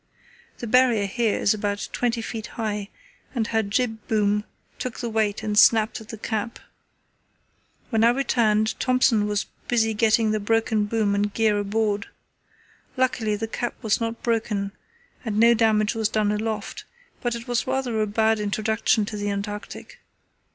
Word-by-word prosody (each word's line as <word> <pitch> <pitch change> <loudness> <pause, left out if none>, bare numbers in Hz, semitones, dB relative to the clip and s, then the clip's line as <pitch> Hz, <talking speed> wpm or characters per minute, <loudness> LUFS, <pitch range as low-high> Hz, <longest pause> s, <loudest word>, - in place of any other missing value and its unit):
The - - -6
Barrier 235 -3 +4
here 220 +2 0
is 200 - +3
about 205 -1 -2
twenty 235 -1 -1
feet 225 -1 -5
high, 210 -3 -3 0.5
and 230 -3 +1
her 225 0 +1
jib 220 +1 -2
boom 210 -1 +1 0.3
took 250 -2 -4
the 235 -2 -3
weight 215 -2 0
and 210 -1 -1
snapped 220 +1 +5
at 220 - -14
the 220 - -7
cap. 220 +2 -3 1.3
When 225 -1 +2
I 230 - +7
returned 225 -4 +1
Thompson 250 -4 +3
was 205 -1 -1 0.2
busy 225 -2 +2
getting 220 0 +3
the 215 - 0
broken 220 0 +1
boom 210 -1 0
and 205 +1 0
gear 215 -1 +2
aboard. 205 0 -1 0.9
Luckily 240 -4 +1
the 225 +2 -3
cap 240 +2 -3
was 220 +1 +1
not 230 0 -3
broken 215 -4 -1 0.5
and 215 -3 -2
no 235 +1 +7
damage 220 -2 +2
was 220 -2 0
done 210 -1 +1
aloft, 215 0 -3 0.4
but 240 -1 -1
it 235 +2 -8
was 245 0 -1
rather 255 -4 -1
a 215 - +1
bad 220 +1 +2
introduction 215 +1 +1
to 210 - -6
the 205 0 -2
Antarctic. 205 +1 -6
220 Hz, 160 wpm, -24 LUFS, 210-230 Hz, 1.3 s, I